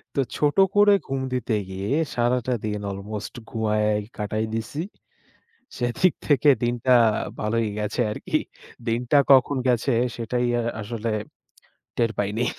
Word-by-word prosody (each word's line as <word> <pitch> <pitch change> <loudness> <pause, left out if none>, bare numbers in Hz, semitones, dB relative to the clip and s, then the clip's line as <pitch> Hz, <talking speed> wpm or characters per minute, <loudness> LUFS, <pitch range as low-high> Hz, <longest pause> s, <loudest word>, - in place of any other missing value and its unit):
তো - - 0 0.2
ছোট 145 -1 +1 0.2
করে 205 0 +6
ঘুম 135 0 -2
দিতে 125 -2 -1 0.2
গিয়ে 95 +3 -4 0.2
সারাটা 125 +1 +1
দিন 105 -1 -2
অলমোস্ট 100 +2 -6 0.2
ঘুমাইয়া 105 -1 +1 0.3
কাটাই 110 +1 -2
দিছি। 115 +6 -4 1.0
সেদিক 125 +8 +2
থেকে 145 -1 +4
দিনটা 120 +1 +2 0.5
ভালই 115 +2 0
গেছে 105 +4 -1
আরকি। - - -1 0.5
দিনটা 120 +5 +2
কখন 135 +1 +5
গেছে 125 +2 +2 0.2
সেটাই 120 +1 -1 0.2
আ-আসলে 115 0 -3 0.9
টের 115 -1 +2
পাইনি। 105 +4 0
115 Hz, 120 wpm, -24 LUFS, 105-125 Hz, 1.0 s, করে